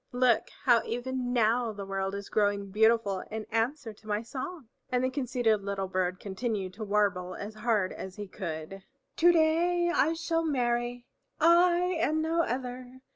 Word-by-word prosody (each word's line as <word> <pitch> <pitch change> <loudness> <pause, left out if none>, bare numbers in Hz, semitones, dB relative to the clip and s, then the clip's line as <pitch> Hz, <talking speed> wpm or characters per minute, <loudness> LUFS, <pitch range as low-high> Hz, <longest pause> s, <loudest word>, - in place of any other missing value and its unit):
Look, 245 -2 +3
how 240 -4 +5
even 245 +1 -3
now 235 0 +2
the 200 -1 -7
world 195 0 -2
is 200 0 -6
growing 205 -2 0
beautiful 220 -2 +3
in 220 0 -5
answer 230 +1 -1
to 215 +1 -20
my 210 +1 -1
song." 275 +4 -6 0.2
And 250 0 +1
the 255 - +1
conceited 245 -5 +1
little 195 -1 -2
bird 185 -1 -1
continued 200 -2 -3
to 215 +3 -7
warble 200 -3 0
as 205 +2 -6
hard 215 -3 0
as 190 -1 -8
he 210 - -6
could, 185 0 -6 0.3
"To 345 +2 +6
day 345 +2 +2
I 320 -2 +3
shall 330 0 -1
marry, 245 -4 -1 0.3
I 345 +2 +4
and 310 +1 +1
no 330 +1 +1
other! 255 -1 -4
235 Hz, 165 wpm, -29 LUFS, 200-265 Hz, 0.3 s, To